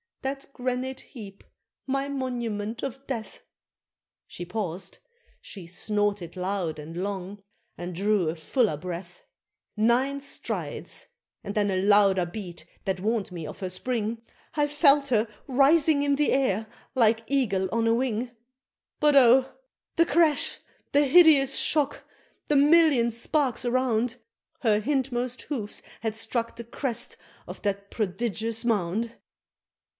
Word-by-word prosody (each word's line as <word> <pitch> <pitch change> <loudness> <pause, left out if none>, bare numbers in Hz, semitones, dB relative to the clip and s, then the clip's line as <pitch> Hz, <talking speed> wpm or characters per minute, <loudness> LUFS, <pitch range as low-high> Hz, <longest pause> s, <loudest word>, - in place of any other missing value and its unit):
that 275 +1 -3
granite 255 +1 -3
heap 200 -7 -11 0.4
my 275 +1 -1
monument 235 -5 -3
of 270 0 -5
death! 230 -5 -5 0.8
She 175 - -7
paused, 185 -2 -5 0.4
she 190 -4 -9
snorted 200 0 -2
loud 185 -3 -2
and 160 +3 -8
long, 200 0 -5 0.4
and 175 +1 -5
drew 200 -2 +1
a 160 - -3
fuller 170 - 0
breath; 180 - -7 0.5
Nine 250 +6 +2
strides 280 - -5 0.4
and 200 -1 -5
then 205 -1 +2
a 185 0 0
louder 200 -2 +4
beat 175 -3 -8 0.2
that 190 -1 -1
warn'd 215 0 -1
me 170 -3 -6
of - - -9
her 185 - -3
spring, 225 +3 -2 0.3
I 295 -1 +2
felt 290 -1 +4
her 225 -2 +2 0.2
rising 285 +3 +4
in 285 -1 +2
the 295 +1 +2
air 225 -6 +1 0.3
like 230 -2 +3
eagle 205 -9 +1
on 230 +1 +1
the 230 - +4
wing 240 0 -1 0.7
But 295 -1 +4
oh! 260 0 +6 0.5
the 335 - +5
crash! 315 -1 +2 0.3
the 290 +1 +5
hideous 280 -3 +6
shock! 290 -2 +1 0.4
the 295 - +2
million 290 -4 +5
sparks 250 +2 0
around! 245 -1 +1 0.5
Her 215 -4 +3
hindmost 250 -1 -1
hoofs 225 -9 -5 0.2
had 220 -1 -2
struck 230 +1 -2
the 235 - -7
crest 240 0 -3 0.3
of - - -9
that 200 -1 -2
prodigious 225 +2 -2
mound! 225 +1 0
230 Hz, 130 wpm, -26 LUFS, 200-270 Hz, 0.8 s, oh